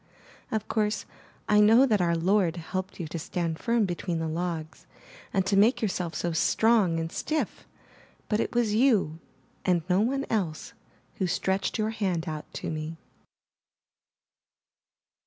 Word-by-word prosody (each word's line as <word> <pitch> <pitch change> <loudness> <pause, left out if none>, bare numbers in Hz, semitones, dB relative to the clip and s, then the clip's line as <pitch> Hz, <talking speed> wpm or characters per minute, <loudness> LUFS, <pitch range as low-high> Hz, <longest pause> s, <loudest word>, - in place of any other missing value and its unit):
Of 220 -1 -2
course, 215 -1 0 0.4
I 210 0 +5
know 225 +5 +7
that 215 -7 +2
our 170 -1 +2
Lord 180 0 +2
helped 185 +4 -5
you 170 - -3
to 165 - -4
stand 165 0 -3
firm 235 -2 +2
between 175 -1 -3
the 165 0 -2
logs, 165 -1 -4 0.4
and 190 -2 +1
to 195 +1 +1
make 215 +6 +5
yourself 180 -5 -2
so 175 - -1
strong 190 +1 +3
and 165 0 -3
stiff, 310 0 -3 0.6
but 210 - 0
it - - -2
was 235 -3 +2
you, 215 - +3 0.4
and 175 -3 +2
no 185 +1 +3
one 270 +5 0
else, 180 -9 -2 0.4
who 185 - 0
stretched 190 +2 0
your 215 0 0
hand 185 -6 -1
out 155 -1 -6
to - - -4
me. 155 +1 -5
190 Hz, 150 wpm, -27 LUFS, 165-215 Hz, 0.6 s, know